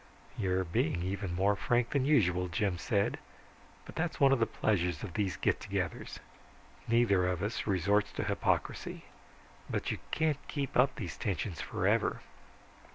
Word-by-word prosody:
"You're 95 Hz, -2 st, 0 dB
being 85 Hz, 0 st, 0 dB
even 95 Hz, -1 st, -3 dB
more 100 Hz, +3 st, +3 dB
frank 120 Hz, +2 st, +1 dB
than 140 Hz, -2 st, +1 dB
usual," 90 Hz, -, +3 dB
Jim 90 Hz, +1 st, -1 dB
said. 100 Hz, +1 st, 0 dB, 0.7 s
"But -, -, -10 dB
that's 170 Hz, +1 st, -2 dB
one 140 Hz, -1 st, +6 dB
of 135 Hz, -, +4 dB
the 115 Hz, -, +3 dB
pleasures 90 Hz, -7 st, 0 dB
of 95 Hz, -5 st, -6 dB
these 100 Hz, -2 st, -1 dB
get -, -, +1 dB
togethers, -, -, -3 dB, 0.7 s
neither 115 Hz, -6 st, +3 dB
of 90 Hz, 0 st, -1 dB
us 105 Hz, +2 st, -2 dB
resorts 100 Hz, +1 st, +2 dB
to -, -, -2 dB
hypocrisy. -, -, -1 dB, 0.6 s
But -, -, -1 dB
you -, -, -3 dB
can't 155 Hz, -3 st, +1 dB
keep 140 Hz, -3 st, -3 dB
up 130 Hz, +1 st, +4 dB
these 85 Hz, -, -5 dB
tensions 95 Hz, -4 st, -2 dB
forever." -, -, +1 dB
100 Hz, 155 wpm, -32 LUFS, 90-120 Hz, 0.7 s, one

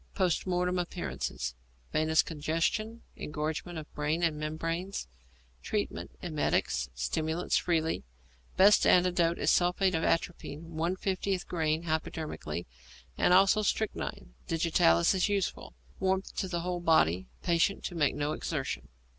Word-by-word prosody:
Post 185 Hz, -2 st, +1 dB
Mortem 180 Hz, 0 st, +1 dB
Appearances. 170 Hz, -, -3 dB, 0.4 s
Venous 160 Hz, +1 st, +3 dB
congestion, 165 Hz, +9 st, -1 dB
engorgement 155 Hz, +3 st, -4 dB
of 155 Hz, -1 st, -8 dB
brain 150 Hz, +3 st, -1 dB
and 165 Hz, -2 st, +2 dB
membranes. 165 Hz, +5 st, -3 dB, 0.5 s
Treatment. -, -, -3 dB
Emetics, 65 Hz, -, 0 dB
stimulants 155 Hz, -, -1 dB
freely. 165 Hz, -2 st, +1 dB, 0.5 s
Best 200 Hz, +2 st, +6 dB
antidote 175 Hz, -2 st, +4 dB
is -, -, +2 dB
sulphate 180 Hz, +1 st, +3 dB
of 160 Hz, -1 st, 0 dB
atropine, 165 Hz, -1 st, -2 dB
1/50 185 Hz, +3 st, -1 dB
grain 160 Hz, -1 st, 0 dB
hypodermically, 155 Hz, -, -3 dB, 0.5 s
and -, -, +2 dB
also 195 Hz, +3 st, +6 dB
strychnine. 200 Hz, -, -2 dB
Digitalis 160 Hz, -, +3 dB
also 190 Hz, +2 st, +1 dB
useful. 195 Hz, -, -2 dB, 0.2 s
Warmth 190 Hz, 0 st, 0 dB
to 185 Hz, -2 st, -1 dB
whole 180 Hz, 0 st, -2 dB
body. 95 Hz, -, +3 dB, 0.2 s
Patient 170 Hz, +3 st, +2 dB
to -, -, -4 dB
make 150 Hz, -4 st, +1 dB
no 145 Hz, +1 st, -1 dB
exertion. 135 Hz, -, -3 dB
165 Hz, 120 wpm, -30 LUFS, 155-180 Hz, 0.5 s, Best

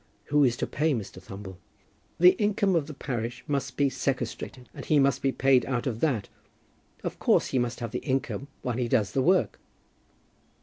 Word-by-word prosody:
"Who 145 Hz, 0 st, +6 dB
is 120 Hz, -3 st, +2 dB
to -, -, -1 dB
pay 155 Hz, -1 st, 0 dB
Mr. 105 Hz, -4 st, -6 dB
Thumble?" 95 Hz, -1 st, -9 dB, 0.6 s
"The 180 Hz, +1 st, +9 dB
income 200 Hz, -2 st, +2 dB
of 155 Hz, -3 st, +1 dB
the 155 Hz, -, -7 dB
parish 120 Hz, -4 st, -4 dB
must 140 Hz, -2 st, -2 dB
be 145 Hz, -, +4 dB
sequestrated, 130 Hz, -2 st, -3 dB
and -, -, -8 dB
he 155 Hz, -, +2 dB
must 140 Hz, -2 st, +3 dB
be 135 Hz, -, +2 dB
paid 135 Hz, -1 st, +3 dB
out 125 Hz, -3 st, -1 dB
of 115 Hz, -4 st, -2 dB
that. 125 Hz, -10 st, 0 dB, 0.8 s
Of -, -, -4 dB
course -, -, +3 dB
he 130 Hz, -, +1 dB
must 120 Hz, 0 st, -2 dB
have 115 Hz, -2 st, -4 dB
the 125 Hz, -, -2 dB
income 135 Hz, 0 st, -2 dB, 0.2 s
while 125 Hz, -2 st, -2 dB
he 125 Hz, -2 st, 0 dB
does 115 Hz, -4 st, +1 dB
the 135 Hz, -, +1 dB
work." 185 Hz, +6 st, +2 dB
130 Hz, 190 wpm, -27 LUFS, 120-145 Hz, 0.8 s, The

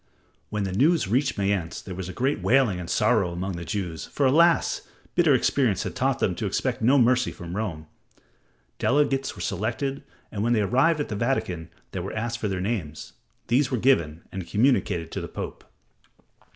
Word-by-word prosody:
When 105 Hz, -1 st, -2 dB
the 95 Hz, -, -2 dB
news 150 Hz, -, +3 dB
reached 130 Hz, +5 st, +1 dB
Mayence 100 Hz, -4 st, -1 dB
there 95 Hz, -, -8 dB
was 90 Hz, 0 st, -5 dB
great 135 Hz, +9 st, -1 dB
wailing 120 Hz, -8 st, +3 dB
and 90 Hz, -1 st, -6 dB
sorrow 105 Hz, -3 st, +2 dB
among 90 Hz, +3 st, -3 dB
the 85 Hz, -, -6 dB
Jews, 85 Hz, -2 st, -4 dB
for, 140 Hz, -, 0 dB
alas! 165 Hz, +6 st, +4 dB, 0.3 s
bitter 165 Hz, -6 st, +4 dB
experience 125 Hz, -5 st, +1 dB
had -, -, -5 dB
taught -, -, +1 dB
them -, -, +1 dB
to -, -, -2 dB
expect -, -, -1 dB
no 130 Hz, +6 st, +5 dB
mercy 125 Hz, 0 st, +3 dB
from 85 Hz, +1 st, -8 dB
Rome. 90 Hz, -8 st, -3 dB, 0.9 s
Delegates 135 Hz, -1 st, +1 dB
were -, -, -8 dB
selected, 120 Hz, +8 st, -2 dB, 0.3 s
and 100 Hz, -, -3 dB
when 120 Hz, +1 st, +2 dB
they 110 Hz, -, +2 dB
arrived 135 Hz, -, +3 dB
at -, -, -4 dB
the 105 Hz, -, -3 dB
Vatican 95 Hz, -8 st, -1 dB, 0.2 s
they -, -, -4 dB
were -, -, -5 dB
asked 120 Hz, +2 st, -2 dB
for 105 Hz, -, -1 dB
their 95 Hz, -2 st, -2 dB
names. 90 Hz, -8 st, -4 dB, 0.3 s
These 130 Hz, +3 st, +2 dB
were 130 Hz, -, 0 dB
given 85 Hz, -, +2 dB
and 95 Hz, -3 st, -6 dB
communicated 100 Hz, -, +1 dB
to -, -, -4 dB
the -, -, -5 dB
Pope. -, -, -7 dB
110 Hz, 185 wpm, -25 LUFS, 95-130 Hz, 0.9 s, no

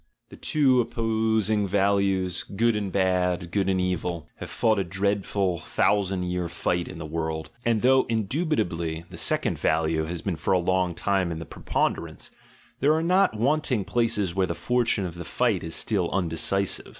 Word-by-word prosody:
The -, -, -12 dB
two 135 Hz, -5 st, +3 dB
opposing 110 Hz, -2 st, 0 dB
values, 95 Hz, -2 st, +1 dB
"good 115 Hz, +3 st, 0 dB
and 100 Hz, -2 st, -2 dB
bad," 90 Hz, -2 st, 0 dB
"good 95 Hz, 0 st, 0 dB
and 95 Hz, -1 st, +1 dB
evil," 90 Hz, -3 st, -2 dB
have -, -, -7 dB
fought 110 Hz, -2 st, +1 dB
a -, -, +1 dB
dread 100 Hz, +2 st, -1 dB
ful, 95 Hz, -4 st, 0 dB
thousand 95 Hz, -1 st, 0 dB
year 90 Hz, -1 st, -2 dB
fight 85 Hz, 0 st, -1 dB
in -, -, -8 dB
the 80 Hz, -, -6 dB
world, 80 Hz, 0 st, -4 dB
and 115 Hz, -2 st, +1 dB
though 130 Hz, +1 st, +5 dB
indubit 130 Hz, -, -1 dB
ably 85 Hz, -1 st, -2 dB
the -, -, -9 dB
second -, -, +1 dB
value 80 Hz, 0 st, +1 dB
has 85 Hz, +1 st, -5 dB
been 95 Hz, -5 st, -2 dB
for 80 Hz, -, 0 dB
a -, -, +4 dB
long 90 Hz, -1 st, 0 dB
time 95 Hz, -2 st, 0 dB
in 80 Hz, -, -4 dB
the 80 Hz, -, -6 dB
preponderance, -, -, -3 dB, 0.5 s
there 150 Hz, +3 st, +3 dB
are 160 Hz, -, 0 dB
not 180 Hz, -, +3 dB
wanting 130 Hz, -3 st, +1 dB
places 105 Hz, -6 st, 0 dB
where 95 Hz, 0 st, +1 dB
the -, -, -3 dB
fortune 120 Hz, -5 st, +1 dB
of 85 Hz, -, -5 dB
the 85 Hz, +1 st, -7 dB
fight 110 Hz, +1 st, 0 dB
is 80 Hz, 0 st, -2 dB
still 95 Hz, -6 st, +1 dB
undecisive. 95 Hz, +2 st, 0 dB
95 Hz, 180 wpm, -25 LUFS, 85-110 Hz, 0.5 s, though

